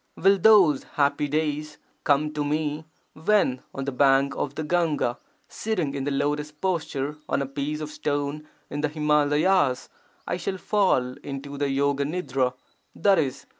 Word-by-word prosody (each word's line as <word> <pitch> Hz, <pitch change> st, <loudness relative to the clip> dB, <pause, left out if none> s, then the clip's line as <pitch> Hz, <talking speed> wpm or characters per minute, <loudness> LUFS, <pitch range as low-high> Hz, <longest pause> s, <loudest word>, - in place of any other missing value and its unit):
Will 195 Hz, +2 st, +4 dB
those 185 Hz, -9 st, +6 dB
happy 145 Hz, 0 st, +2 dB
days 150 Hz, 0 st, -2 dB, 0.3 s
come 150 Hz, +1 st, +2 dB
to 150 Hz, -1 st, -1 dB
me 150 Hz, +1 st, -2 dB, 0.3 s
when 160 Hz, -7 st, +1 dB
on 135 Hz, -, -5 dB
the 140 Hz, -, -2 dB
bank 135 Hz, +1 st, +3 dB
of 140 Hz, -1 st, -3 dB
the 155 Hz, -, -3 dB
Gahga, 155 Hz, -6 st, 0 dB, 0.3 s
sitting 180 Hz, -11 st, -2 dB
in 135 Hz, -1 st, -3 dB
the -, -, 0 dB
lotus 145 Hz, +2 st, -1 dB
posture 150 Hz, -4 st, -2 dB
on -, -, +1 dB
a 140 Hz, -, -1 dB
piece 145 Hz, +3 st, -4 dB
of 150 Hz, 0 st, -5 dB
stone 145 Hz, 0 st, -3 dB, 0.2 s
in 145 Hz, -, -3 dB
the 150 Hz, -, 0 dB
Himalayas, 150 Hz, 0 st, +2 dB, 0.4 s
I -, -, -1 dB
shall 190 Hz, +1 st, -3 dB
fall 185 Hz, -12 st, +1 dB
into 140 Hz, 0 st, -7 dB
the 140 Hz, 0 st, -1 dB
yoga 140 Hz, +1 st, +1 dB
nidra 135 Hz, -6 st, -1 dB, 0.4 s
(i.e. 165 Hz, -9 st, +3 dB
150 Hz, 155 wpm, -25 LUFS, 140-155 Hz, 0.4 s, those